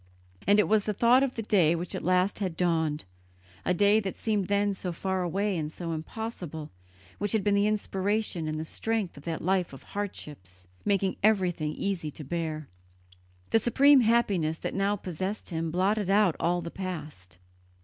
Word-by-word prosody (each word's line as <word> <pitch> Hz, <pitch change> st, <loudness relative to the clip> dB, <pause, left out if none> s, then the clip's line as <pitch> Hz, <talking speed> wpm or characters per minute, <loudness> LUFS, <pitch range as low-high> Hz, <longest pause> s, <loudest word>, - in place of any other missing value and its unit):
And 205 Hz, +1 st, +6 dB
it -, -, +4 dB
was 215 Hz, -1 st, +3 dB
the 210 Hz, -, -1 dB
thought 240 Hz, +5 st, +5 dB
of 270 Hz, -2 st, 0 dB
the 225 Hz, -, -3 dB
day 175 Hz, -6 st, +3 dB
which 170 Hz, +1 st, -4 dB
at -, -, -4 dB
last 185 Hz, +3 st, +2 dB
had 185 Hz, -5 st, -3 dB
dawned, 160 Hz, -, 0 dB, 0.6 s
a -, -, 0 dB
day 205 Hz, +4 st, +4 dB
that 195 Hz, -3 st, -4 dB
seemed 210 Hz, -4 st, -1 dB
then 205 Hz, 0 st, +2 dB
so 185 Hz, -1 st, -4 dB
far 190 Hz, +2 st, -2 dB
away 195 Hz, +3 st, 0 dB
and 155 Hz, -2 st, -3 dB
so 170 Hz, 0 st, -5 dB
impossible, 165 Hz, -2 st, -5 dB, 0.5 s
which 205 Hz, +1 st, 0 dB
had 220 Hz, -3 st, +2 dB
been 205 Hz, -, +2 dB
the 200 Hz, +1 st, +3 dB
inspiration 205 Hz, -4 st, -1 dB
and 155 Hz, 0 st, -2 dB
the 160 Hz, -, -3 dB
strength 220 Hz, +1 st, -2 dB
of 140 Hz, -, -13 dB
that 165 Hz, -2 st, -3 dB
life 185 Hz, -3 st, +1 dB
of 135 Hz, -, -11 dB
hardships, 95 Hz, -, -7 dB, 0.2 s
making 195 Hz, -2 st, +1 dB
everything 180 Hz, -7 st, +2 dB
easy 190 Hz, -5 st, -2 dB
to 150 Hz, -, -8 dB
bear. 155 Hz, 0 st, -3 dB, 0.8 s
The 225 Hz, -, +5 dB
supreme 270 Hz, +4 st, +5 dB
happiness 200 Hz, -9 st, +2 dB
that -, -, -4 dB
now 200 Hz, +1 st, +1 dB
possessed 190 Hz, +2 st, -4 dB
him 165 Hz, 0 st, -2 dB
blotted 190 Hz, +4 st, +1 dB
out 200 Hz, -4 st, +4 dB
all 175 Hz, +1 st, +1 dB
the 170 Hz, -, -6 dB
past. 150 Hz, -, -7 dB
185 Hz, 180 wpm, -28 LUFS, 160-205 Hz, 0.8 s, And